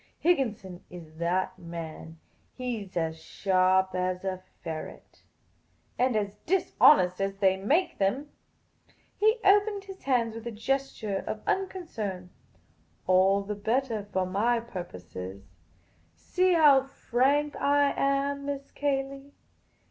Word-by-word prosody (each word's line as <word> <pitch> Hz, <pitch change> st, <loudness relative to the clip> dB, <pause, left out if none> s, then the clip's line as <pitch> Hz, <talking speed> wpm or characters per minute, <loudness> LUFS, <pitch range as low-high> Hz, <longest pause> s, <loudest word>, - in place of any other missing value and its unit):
Higginson 220 Hz, -, 0 dB
is 160 Hz, -3 st, -12 dB
that 180 Hz, +2 st, -1 dB
man. 165 Hz, -1 st, -8 dB, 0.4 s
He 250 Hz, -4 st, -3 dB
's 190 Hz, -2 st, -9 dB
as 160 Hz, -1 st, -2 dB
sharp 190 Hz, +1 st, +2 dB
as 185 Hz, 0 st, -1 dB
a 185 Hz, -1 st, -3 dB, 0.2 s
ferret." 160 Hz, -1 st, -8 dB, 0.4 s
" -, -, -39 dB
And 250 Hz, -1 st, +2 dB
as 205 Hz, -1 st, -1 dB
dishonest 195 Hz, -, +4 dB
as 195 Hz, 0 st, -2 dB
they 190 Hz, -2 st, +3 dB
make 300 Hz, -, 0 dB
them." 255 Hz, +10 st, 0 dB, 0.8 s
He 435 Hz, +3 st, +3 dB
opened 405 Hz, +1 st, +4 dB
his 385 Hz, -1 st, -11 dB
hands 240 Hz, -4 st, +1 dB
with 225 Hz, +1 st, -7 dB
a -, -, -3 dB
gesture 225 Hz, -3 st, -2 dB
of 215 Hz, -, -4 dB
unconcern. 225 Hz, -, -3 dB, 0.4 s
" -, -, -38 dB
All 190 Hz, +2 st, +4 dB
the 205 Hz, +1 st, -4 dB
bettah 220 Hz, 0 st, -1 dB
for 185 Hz, -1 st, 0 dB
my 220 Hz, +6 st, +1 dB
purpose. 180 Hz, -, -9 dB, 1.0 s
See 365 Hz, -, +1 dB
how 295 Hz, -5 st, +6 dB
frank 275 Hz, +2 st, 0 dB
I 285 Hz, 0 st, +3 dB
am, 280 Hz, 0 st, 0 dB
Miss 280 Hz, -1 st, -5 dB
Cayley. 275 Hz, 0 st, -3 dB
220 Hz, 125 wpm, -28 LUFS, 185-280 Hz, 1.0 s, how